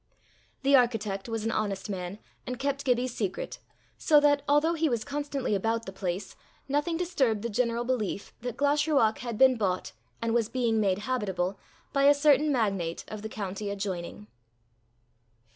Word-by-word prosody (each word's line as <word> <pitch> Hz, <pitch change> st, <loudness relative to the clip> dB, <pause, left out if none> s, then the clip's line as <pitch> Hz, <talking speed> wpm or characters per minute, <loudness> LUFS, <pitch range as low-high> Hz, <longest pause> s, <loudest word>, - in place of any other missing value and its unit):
The 275 Hz, +1 st, +5 dB
architect 225 Hz, -5 st, +1 dB
was 225 Hz, -1 st, -3 dB
an 225 Hz, -, 0 dB
honest 200 Hz, -3 st, -2 dB
man, 185 Hz, -1 st, -4 dB, 0.3 s
and 250 Hz, -, -3 dB
kept 280 Hz, +2 st, -2 dB
Gibbie's 250 Hz, -1 st, +1 dB
secret, 195 Hz, -5 st, -3 dB, 0.4 s
so 300 Hz, -2 st, +5 dB
that, 290 Hz, -1 st, +4 dB
although 295 Hz, +3 st, +4 dB
he 325 Hz, -1 st, +1 dB
was 235 Hz, -3 st, -1 dB
constantly 285 Hz, -4 st, -2 dB
about 225 Hz, +3 st, 0 dB
the 195 Hz, -, -6 dB
place, 195 Hz, 0 st, -4 dB, 0.3 s
nothing 295 Hz, +4 st, 0 dB
disturbed 270 Hz, -, 0 dB
the 235 Hz, -, -2 dB
general 235 Hz, +1 st, 0 dB
belief 235 Hz, -5 st, -2 dB
that 245 Hz, -1 st, -5 dB
Glashruach 285 Hz, -5 st, +2 dB
had 235 Hz, -3 st, -4 dB
been 260 Hz, 0 st, +6 dB
bought, 190 Hz, -4 st, -1 dB, 0.3 s
and 230 Hz, 0 st, -1 dB
was 230 Hz, -2 st, +1 dB
being 235 Hz, -3 st, +1 dB
made 195 Hz, -3 st, +2 dB
habitable, 195 Hz, -6 st, -1 dB, 0.3 s
by 275 Hz, -1 st, +3 dB
a 290 Hz, +1 st, +7 dB
certain 295 Hz, 0 st, +4 dB
magnate 195 Hz, -9 st, -1 dB
of 215 Hz, -1 st, -6 dB
the 220 Hz, -, -5 dB
county 200 Hz, -1 st, -4 dB
adjoining. 195 Hz, -1 st, -4 dB
230 Hz, 160 wpm, -28 LUFS, 200-275 Hz, 0.4 s, a